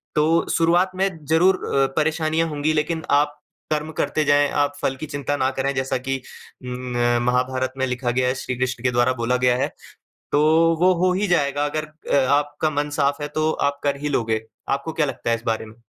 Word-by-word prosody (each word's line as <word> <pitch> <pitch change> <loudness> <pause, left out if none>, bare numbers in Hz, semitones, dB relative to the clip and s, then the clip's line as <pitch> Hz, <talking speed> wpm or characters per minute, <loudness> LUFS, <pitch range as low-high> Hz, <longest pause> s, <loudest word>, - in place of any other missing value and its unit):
तो 160 +2 +3
शुरुआत 175 +3 +3
में 195 +1 +1 0.2
ज़रूर 170 +5 +4
अ, 135 0 +2
परेशानियाँ 160 +1 +1
होंगी, 150 +1 0
लेकिन 160 +1 -1
आप 145 +1 +2 0.3
कर्म 155 +1 -1
करते 150 +2 0
जाएँ, 145 0 +4
आप 145 0 0
फल 135 - 0
की 135 - -6
चिंता 145 -1 -3
ना 130 0 +1
करें, 140 +1 0
जैसा 130 -1 -1
कि 135 -1 -1 0.4
उम, 125 0 -5
अ, 120 0 +2
महाभारत 130 +1 0
में 130 - +1
लिखा 125 -1 -1
गया 125 +1 +1
है, 130 - 0
श्री 130 0 -4
कृष्ण 125 -1 -2
के 125 - +2
द्वारा 120 +1 +2
बोला 125 +2 +1
गया 125 -1 +4
है। - - +1 0.7
तो 145 - +4 0.4
वो 185 +1 +5
हो 185 - +3
ही 200 +3 0
जाएगा, 145 -4 +1
अगर 155 +1 -2 0.3
अ, 135 - +2
आपका 145 +1 -2
मन 145 0 -2
साफ़ 140 +1 +1
है, 145 - -3
तो 155 +1 0 0.2
आप 140 0 -6
कर 140 -1 +1
ही 150 - -2
लोगे। 115 -5 0 0.3
आपको 140 +4 -1
क्या 155 -1 +1
लगता 135 - -3
है 115 - +3
इस 115 - -12
बारे 110 0 -1
में? 110 +2 -16
145 Hz, 215 wpm, -22 LUFS, 130-155 Hz, 0.7 s, वो